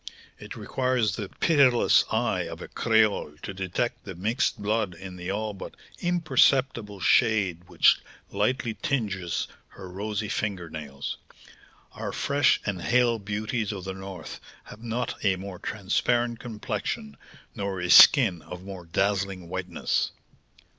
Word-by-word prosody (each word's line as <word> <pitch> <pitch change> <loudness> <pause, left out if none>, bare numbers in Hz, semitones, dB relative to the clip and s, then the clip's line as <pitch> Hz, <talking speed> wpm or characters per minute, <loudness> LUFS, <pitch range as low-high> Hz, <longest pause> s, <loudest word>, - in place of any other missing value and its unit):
It - - -9
requires 125 -5 0
the 105 -4 -5
pitiless 140 -7 +4
eye - - 0
of - - -8
a - - -8
creole 110 -9 +1
to - - -5
detect 95 +6 -2
the 95 - -8
mixed 105 +8 0
blood 105 -3 -1
in 90 +1 -9
the 90 0 -6
all 105 +2 -2
but 95 - -9 0.2
imperceptible 135 - +2
shade 95 -5 +2
which 90 -2 +4 0.3
lightly 125 -3 0
tinges 105 - -2 0.2
her 95 - -11
rosy 105 +3 -3
finger 95 -5 -3
nails. 70 -3 -6 0.7
Our - - -5
fresh 140 -1 +2
and 95 -4 -2
hale 120 0 +2
beauties 105 +2 -2
of 95 -3 -6
the 95 0 -4
North 95 -3 -8 0.2
have 105 - -13
not 120 +1 -3
a 100 -2 +3
more 95 -1 -8
transparent 120 +3 0
complexion, 105 - -4 0.4
nor 100 -2 -3
a 90 0 0
skin 110 - +8
of 90 +4 -9
more 95 -2 -8
dazzling 95 -1 -1
whiteness." 90 -1 -1
100 Hz, 135 wpm, -26 LUFS, 95-120 Hz, 0.7 s, skin